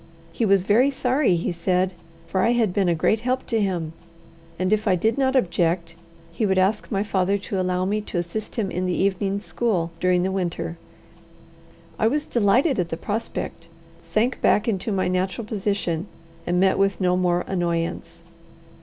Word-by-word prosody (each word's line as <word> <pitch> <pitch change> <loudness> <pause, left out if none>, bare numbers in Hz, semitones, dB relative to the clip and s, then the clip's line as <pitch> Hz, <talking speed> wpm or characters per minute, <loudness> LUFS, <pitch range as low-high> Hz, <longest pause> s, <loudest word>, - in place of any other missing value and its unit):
He 230 - -1
was 195 -2 +4
very 230 +8 +4
sorry, 260 -5 +1
he 170 +2 -1
said, 180 +2 0 0.3
for 190 +2 -1
I 230 +5 +3
had 225 -6 +1
been 190 -2 +2
a 170 - +2
great 210 +7 +2
help 255 +3 -1
to 225 -2 0
him; 175 -5 -2 0.6
and 185 +3 +1
if 215 +1 0
I 190 - +4
did 220 +6 +1
not 265 -1 +1
object, 170 -6 +1 0.4
he 170 - -3
would 190 -2 +2
ask 195 +3 +1
my 200 -1 +1
father 195 -1 +1
to 195 -1 -4
allow 180 0 0
me 210 +2 0
to 200 - -5
assist 175 +5 -4
him 210 -6 -1
in 185 +1 -2
the 180 - 0
evening 195 +1 0
school 200 -6 -1
during 180 0 +2
the 190 - 0
winter. 175 -3 -3 1.2
I 220 - +3
was 295 +5 0
delighted 240 - +2
at 175 -2 -1
the 165 - -3
prospect, 205 -4 -4 0.3
sank 215 +9 -1
back 210 - +3
into 215 0 -1
my 190 -2 0
natural 185 +5 -1
position, 200 -5 -2 0.4
and 175 +1 +1
met 190 +1 +3
with 195 -2 +2
no 180 -1 +2
more 180 -1 +1
annoyance. 170 -3 -2
190 Hz, 180 wpm, -23 LUFS, 180-215 Hz, 1.2 s, was